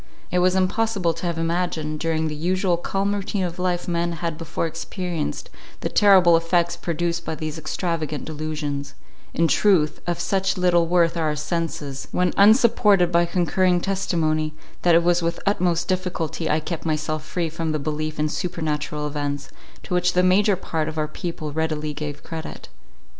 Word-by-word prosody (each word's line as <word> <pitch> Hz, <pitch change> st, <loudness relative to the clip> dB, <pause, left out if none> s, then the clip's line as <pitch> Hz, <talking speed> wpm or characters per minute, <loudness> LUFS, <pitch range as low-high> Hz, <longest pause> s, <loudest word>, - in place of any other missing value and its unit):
It 180 Hz, -, +2 dB
was 180 Hz, +1 st, +3 dB
impossible 190 Hz, -1 st, +1 dB
to 165 Hz, +2 st, -4 dB
have 170 Hz, -1 st, -2 dB
imagined, 165 Hz, -2 st, -1 dB
during 160 Hz, 0 st, 0 dB
the 155 Hz, -, -3 dB
usual 180 Hz, +4 st, +1 dB
calm 195 Hz, +3 st, -1 dB
routine 200 Hz, -1 st, -2 dB
of 175 Hz, 0 st, -4 dB
life 180 Hz, -1 st, -1 dB
men 170 Hz, 0 st, 0 dB
had 165 Hz, -1 st, -3 dB
before 165 Hz, +1 st, -3 dB
experienced, 165 Hz, 0 st, -4 dB, 0.3 s
the -, -, -1 dB
terrible 190 Hz, -5 st, +6 dB
effects 170 Hz, +1 st, +1 dB
produced 170 Hz, 0 st, -2 dB
by 160 Hz, -, -3 dB
these 155 Hz, 0 st, -5 dB
extravagant 155 Hz, -2 st, -3 dB
delusions: 150 Hz, -2 st, -4 dB, 0.4 s
in 165 Hz, -, +3 dB
truth, 160 Hz, -6 st, +3 dB
of 175 Hz, -1 st, -1 dB
such 195 Hz, -1 st, 0 dB
little 175 Hz, -2 st, +3 dB
worth 170 Hz, -1 st, +3 dB
are 165 Hz, -, 0 dB
our 150 Hz, -, 0 dB
senses, 150 Hz, -3 st, -3 dB
when 180 Hz, -1 st, +1 dB
unsupported 205 Hz, -4 st, +5 dB
by 170 Hz, 0 st, +3 dB
concurring 180 Hz, +1 st, +2 dB
testimony, 160 Hz, -5 st, 0 dB, 0.3 s
that 175 Hz, -2 st, +5 dB
it 170 Hz, -, +5 dB
was 175 Hz, 0 st, +3 dB
with 170 Hz, 0 st, 0 dB
the -, -, -12 dB
utmost 175 Hz, -3 st, 0 dB
difficulty 180 Hz, -3 st, -2 dB
I 155 Hz, -, +2 dB
kept 165 Hz, +1 st, -5 dB
myself 155 Hz, -1 st, -1 dB
free 170 Hz, +2 st, -2 dB
from 160 Hz, 0 st, -3 dB
the 155 Hz, -, 0 dB
belief 155 Hz, +1 st, -3 dB
in 150 Hz, 0 st, +1 dB
supernatural 155 Hz, -3 st, -3 dB
events, 145 Hz, -1 st, -3 dB, 0.3 s
to -, -, -5 dB
which 180 Hz, 0 st, +2 dB
the 180 Hz, -, +3 dB
major 195 Hz, +2 st, +4 dB
part 160 Hz, -4 st, -3 dB
of 160 Hz, 0 st, -5 dB
our 155 Hz, -1 st, 0 dB
people 155 Hz, -1 st, -5 dB
readily 155 Hz, -1 st, -1 dB
gave 150 Hz, -1 st, -6 dB
credit. 160 Hz, -1 st, -7 dB
170 Hz, 175 wpm, -23 LUFS, 155-180 Hz, 0.4 s, terrible